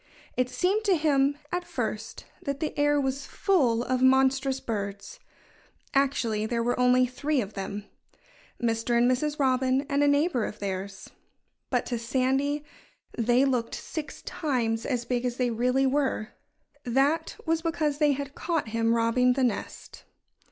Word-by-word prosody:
It 255 0 +1
seemed 390 +9 +1
to 385 -4 +4
him, 285 -2 +2
at 355 0 -1
first, 225 -9 -4 0.2
that 280 -1 -3
the 310 - -3
air 290 0 +3
was 270 0 -2
full 255 - +2
of 255 0 -1
monstrous 265 +1 +3
birds. 205 - -5 0.7
Actually, 235 -6 +1
there 235 0 -1
were 245 +1 0
only 250 0 +5
three 280 +4 -1
of 205 -3 -3
them 200 +1 -5 0.7
Mr. 230 0 0
and 240 +1 +4
Mrs. 295 +4 -1
Robin 260 0 +2
and 280 0 +1
a - - +4
neighbor 285 -3 +2
of 215 - -6
theirs. 195 -1 -5 0.6
But - - 0
to 240 -2 -3
Sandy 270 +4 0 0.5
they 240 +3 +3
looked 250 -4 0
six 315 -1 -7
times 235 -7 -1
as 245 -3 -1
big 245 0 -1
as 245 -1 -2
they 250 -2 +1
really 250 +4 +1
were. 265 -5 0 0.5
That 270 +6 +1
was 325 0 +1
because 310 -3 -1
they 295 -2 +4
had 280 0 -5
caught 325 -9 -2
him 230 +1 +1
robbing 235 +2 +3
the 265 +1 0
nest. 235 -5 -4
260 Hz, 155 wpm, -27 LUFS, 235-285 Hz, 0.7 s, only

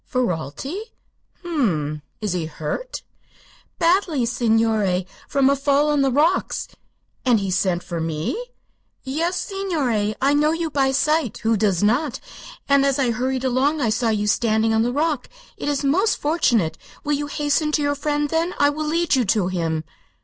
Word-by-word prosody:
"Ferralti. 235 - -2
H 435 - -8 0.6
m 335 -4 -1
m. 150 -2 -3 0.2
Is 210 -4 -1
he 170 -3 -2
hurt?" 160 - -5 0.7
"Badly, 335 -6 +2
signore; 220 -5 +1 0.2
from 275 -2 +3
a 280 - +4
fall 285 +2 +2
on 295 -1 +2
the 270 -1 +2
rocks." 310 +8 +1 0.6
"And 245 -4 +3
he 195 -1 -2
sent 180 -1 0
for 175 -2 -4
me?" 165 - -3 0.6
"Yes, 330 +7 -1
signore. 285 - -1
I 275 +2 +3
know 300 +2 +3
you 330 -1 -2
by 275 -2 +2
sight 300 -2 +1
who 225 0 +3
does 200 -3 +1
not? 245 +6 +1 0.5
and 280 -1 +4
as 275 -1 +2
I 260 -4 +1
hurried 255 +2 -1
along 265 +4 +1
I 240 -5 +1
saw 230 +1 +1
you 210 -1 0
standing 220 +1 +2
on 220 - +3
the 240 +2 +1
rock. 295 -1 -1 0.3
It - - -3
is 285 0 -1
most 370 +11 +2
fortunate. 240 - +1 0.2
Will 295 - 0
you 290 0 -1
hasten 295 +1 0
to 295 - +2
your 285 0 +1
friend, 295 +1 -1
then? 330 +2 0
I 285 0 +4
will 305 +1 -3
lead 335 +1 +1
you 255 - +2
to 195 -2 +1
him." 165 -3 -1
265 Hz, 175 wpm, -22 LUFS, 215-300 Hz, 0.7 s, a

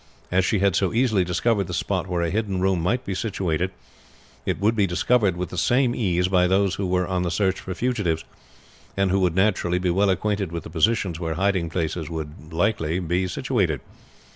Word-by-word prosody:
As 90 +1 +3
she 105 - +1
had 100 -2 +2
so 95 -3 +1
easily 115 -5 +2
discovered 100 +4 +1
the 90 - -4
spot 95 +1 -1
where 90 -2 -1
a 85 - -1
hidden 100 -3 -1
room 95 -2 +1
might 120 +9 0
be 100 - -3
situated, 90 -4 -1 0.8
it - - 0
would 110 +3 +2
be 100 -3 +2
discovered 100 +1 +2
with 90 0 -3
the 90 - -3
same 125 +5 +2
ease 90 -6 +1
by 90 -1 +3
those 95 +1 +2
who 95 - -2
were 90 0 +1
on 90 0 -1
the 90 - 0
search 95 +2 0
for 95 - -6
fugitives, 105 -10 -1 0.7
and 100 -1 +2
who 95 - +2
would 90 -3 +1
naturally 95 -3 +2
be 90 -1 0
well 100 +3 +2
acquainted 100 -1 0
with 85 -2 -4
the - - -10
positions 90 0 +1
where 80 -2 -2
hiding 95 -2 +1
places 80 -1 -2
would 80 -2 -7
be 80 - -10
likely 85 -4 +1
to 95 - -1
be 90 +3 0
situated. 95 - 0
95 Hz, 215 wpm, -24 LUFS, 85-100 Hz, 0.8 s, As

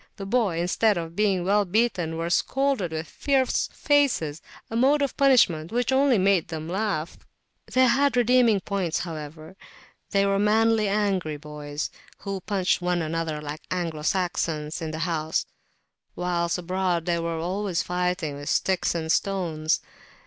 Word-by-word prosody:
The 195 - -7
boys, 195 -6 +1
instead 200 +3 +2
of 165 0 -5
being 195 -3 +1
well 205 +2 +3
beaten, 180 -5 0
were 165 +1 -2
scolded 265 -4 +1
with 160 +1 -4
fierce 270 -3 0
faces, 265 - +1 0.3
a 225 - -6
mode 280 +5 +3
of 280 - -2
punishment 230 - +3
which 245 +2 0
only 265 -2 +4
made 190 -2 +2
them 160 -1 -6
laugh. 185 -3 -2 0.5
They 255 0 +5
had 275 +2 +3
their 245 - +4
redeeming 240 -4 +4
points, 185 -4 -2
however; 155 +1 -8 0.5
they 200 -1 +2
were 195 0 +1
manly 220 +1 +3
angry 195 -6 0
boys, 150 0 -6 0.3
who 195 -2 -5
punched 190 -2 0
one 175 -1 0
another 160 -1 -2
like 150 +1 -6
Anglo 170 -4 -3
Saxons 160 -2 -1
in 160 - -3
the 155 - -5
house, 160 -2 -1 0.7
whilst 175 -1 -1
abroad 180 -1 -1
they 170 -1 0
were 165 0 -2
always 185 +2 -1
[p.294] - - -16
fighting 180 -4 -1
with 145 0 -6
sticks 190 -2 +1
and 160 -1 -1
stones. 165 -6 0
180 Hz, 155 wpm, -25 LUFS, 165-210 Hz, 0.7 s, They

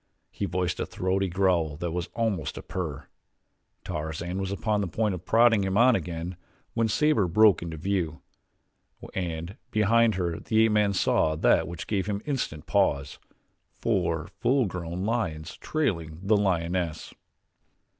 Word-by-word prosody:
He - - -3
voiced 90 0 -1
a - - 0
throaty 95 +1 0
growl 85 -5 +1
that 85 +1 -3
was 85 0 -3
almost 105 - -1
a - - -7
purr. 80 -7 -5 0.8
Tarzan 80 +4 -4
was 95 0 -2
upon 105 +1 0
the 100 - -1
point 105 +4 0
of 90 0 -8
prodding 115 -2 +5
him 95 +1 0
on 125 +2 +6
again 85 0 -4 0.4
when 115 -1 +1
Sabor 145 -3 +2
broke 105 +3 +5
into 85 -1 -5
view, 85 -2 -2 0.9
and 85 0 -4
behind 110 +1 +3
her 85 -3 -2
the 110 0 +3
ape 110 - +2
man 105 -1 +3
saw 80 -4 +2
that 75 - +3
which 85 -1 -6
gave 100 -2 -1
him 100 -1 -1
instant 125 - -3
pause 75 -9 +1 0.6
four - - 0
full 130 -1 +3
grown 90 0 -4
lions 85 -9 -2
trailing 85 - -2
the 105 +2 +3
lioness. 90 -4 -1
95 Hz, 150 wpm, -27 LUFS, 85-105 Hz, 0.9 s, on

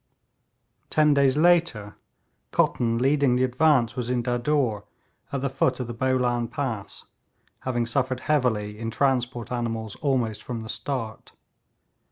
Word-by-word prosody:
Ten 150 -1 +4
days 140 -1 +3
later, 160 -11 +2 0.5
Cotton, 115 -1 +1
leading 135 0 +3
the 125 - +2
advance, 130 -2 +2
was 125 -1 -3
in 125 -1 0
Dadur, 120 -3 0 0.5
at 140 - -2
the 140 - 0
foot 130 -1 0
of 125 - -2
the 120 - -6
Bolan 125 -1 0
Pass, 120 -5 -5 0.5
having 120 -2 -1
suffered 130 +2 -1
heavily 110 -8 0
in 115 0 -3
transport 125 -2 0
animals 115 -3 -3
almost 125 -7 -1
from 115 -3 -5
the 110 - -8
start. 110 -1 -4
125 Hz, 135 wpm, -25 LUFS, 115-135 Hz, 0.5 s, Ten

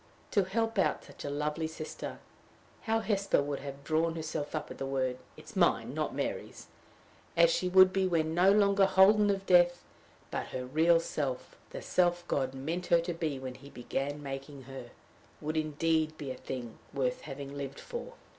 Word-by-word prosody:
To 200 -4 +3
help 225 +2 -1
out - - +1
such - - -11
a 145 - -3
lovely 150 +2 -1
sister 160 0 -6 0.7
how 225 0 +1
Hesper 200 -8 +1
would 145 -1 -3
have 140 0 -8
drawn 160 +2 +1
herself 155 -2 -4
up 155 - -4
at - - -9
the 135 - -2
word! 130 -2 -1 0.2
it - - -13
is - - -12
mine, - - +2
not - - -2
Mary's - - -4 0.7
as 170 0 +6
she 180 - 0
would 185 0 +7
be 190 -1 +2
when 160 -3 +1
no 180 +3 +5
longer 200 -1 +4
holden 205 +2 +6
of 195 -1 0
death, 175 -1 +5 0.5
but - - -3
her 125 0 -5
real 160 +6 +4
self, 140 -6 -3
the - - -7
self 175 -1 +1
God 135 -1 -1
meant 165 +7 -3
her 170 -2 +5
to 170 +1 -2
be 160 -4 -2
when 130 -1 -6
he 140 +2 -13
began 140 +3 -4
making 135 0 -7
her, 130 -2 -9 0.5
would 155 +1 -3
indeed 155 0 0
be 140 -3 -5
a - - -5
thing 125 -3 -7
worth 130 -2 -1
having 140 -1 -7
lived 140 -1 -5
for! 485 +1 -7
155 Hz, 185 wpm, -31 LUFS, 140-180 Hz, 0.7 s, would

